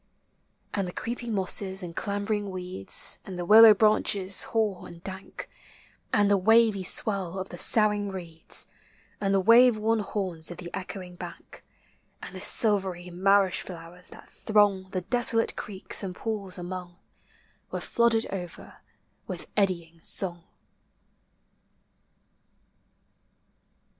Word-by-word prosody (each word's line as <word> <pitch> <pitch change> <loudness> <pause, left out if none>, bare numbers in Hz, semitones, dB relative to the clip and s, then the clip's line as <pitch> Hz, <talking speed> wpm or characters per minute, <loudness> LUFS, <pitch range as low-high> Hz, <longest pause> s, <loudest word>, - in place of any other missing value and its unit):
And 195 -3 -1
the - - -5
creeping 235 -1 -4
mosses 190 0 -1
and 170 -2 -8
clambering 205 0 -2
weeds, 180 - -1
And 185 -2 -8
the 175 - -4
willow 220 +2 +9
branches 200 -2 +3
hoar 215 -5 -2
and 170 0 -13
dank, 190 0 -8 0.6
And 205 -1 +3
the 200 -1 +3
wavy 220 0 +4
swell 190 -1 -1
of 190 0 -5
the 175 - -9
soughing 210 -2 +3
reeds, 170 -4 -3 0.5
And 195 -1 -1
the 195 - +3
wave 230 +4 +6
worn 220 +1 +1
horns 185 -6 -4
of 175 - -8
the 175 -1 -9
echoing 185 -2 -7
bank, - - -11 0.6
And - - -9
the 185 - -8
silvery 190 -4 +2
marish 195 +1 +2
flowers 175 0 -9
that - - -14
throng 205 -3 +1
The 185 -1 -3
desolate 230 +3 +2
creeks 195 -2 -4
and 190 -3 -6
pools 200 -4 -4
among, 180 0 -7 0.7
Were - - -4
flooded 235 -1 +1
over 180 -3 -8 0.5
with - - -6
eddying 170 -5 -1
song. 175 -1 -1
195 Hz, 125 wpm, -27 LUFS, 180-210 Hz, 0.7 s, willow